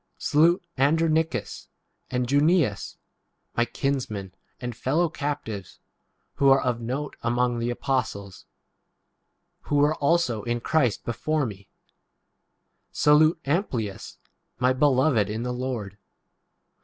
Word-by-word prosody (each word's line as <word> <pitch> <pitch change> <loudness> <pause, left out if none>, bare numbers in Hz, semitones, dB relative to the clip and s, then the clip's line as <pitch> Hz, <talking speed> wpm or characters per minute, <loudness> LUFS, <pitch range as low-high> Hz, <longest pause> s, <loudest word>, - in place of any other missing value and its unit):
Salute 170 +5 +3 0.2
Andronicus 155 -3 +1 0.4
and 125 -1 -1
Junias, 145 - +1 0.6
my 120 - +2
kinsmen 115 -10 -3 0.3
and 120 -2 -5
fellow 155 +8 +1
captives, 140 - -5 0.6
who 140 - +4
are 135 0 +6
of 120 -2 -1
note 130 +6 -4
among 120 0 0
the 120 +1 -1
apostles; 115 -6 -3 1.2
who 145 - -1
were 145 +1 +4
also 140 -7 +1
in 120 +3 -2
8 120 - -11
Christ 135 -9 +1
before 150 +5 -1
me. 100 -4 -8 1.2
Salute 155 +2 +4
Amplias, 135 - -2 0.4
9 125 +1 +3
my - - +2
beloved 130 -5 +3
in 110 +2 -3
the 125 0 -2
Lord. 120 -6 -4
130 Hz, 115 wpm, -25 LUFS, 115-150 Hz, 1.2 s, are